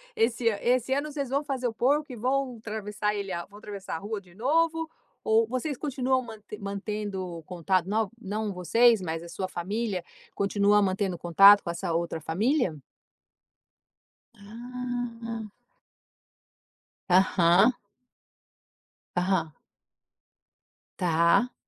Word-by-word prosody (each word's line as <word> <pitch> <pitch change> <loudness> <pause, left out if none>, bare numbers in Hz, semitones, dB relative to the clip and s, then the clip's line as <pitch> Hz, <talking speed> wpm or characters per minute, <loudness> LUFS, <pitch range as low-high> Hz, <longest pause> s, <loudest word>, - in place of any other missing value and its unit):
Esse 235 +1 +1 0.2
esse 250 +1 +2
ano 285 +2 -1
vocês 280 -3 -3
vão 280 +3 0
fazer 265 -4 -2
o 225 - -3
porco, 285 +5 +1
e - - -6
vão 255 +1 -1
atravessar 210 -1 -3
ele 200 -2 -4
a 170 - -3
vão 205 +1 -15
atravessar 200 -4 -6
a - - -4
rua 205 +1 -5
de 180 -2 -20
novo? 325 +6 +1 0.3
Ou, 220 +1 +3
vocês 255 +3 -3
continuam 260 -3 0
mante 220 -3 -10
mantendo 200 -3 -4
contato. 180 0 0
Não 215 -1 +1
não 210 0 -3
vocês, 225 +4 +4
mas, 165 -1 -4
a 170 - -10
sua 185 +2 -4
família, 190 +1 -3 0.3
continua 205 +1 +3
mantendo 190 -2 0
contato 195 +5 +7
com - - -5
essa 170 0 -3
outra 165 -1 -2
família? 210 - +1 1.6
Ah. 230 0 -6 1.6
Aham. 185 +4 +5 1.4
Aham. 180 -3 0 1.4
Tá. 170 +8 +3
210 Hz, 120 wpm, -27 LUFS, 185-245 Hz, 1.6 s, contato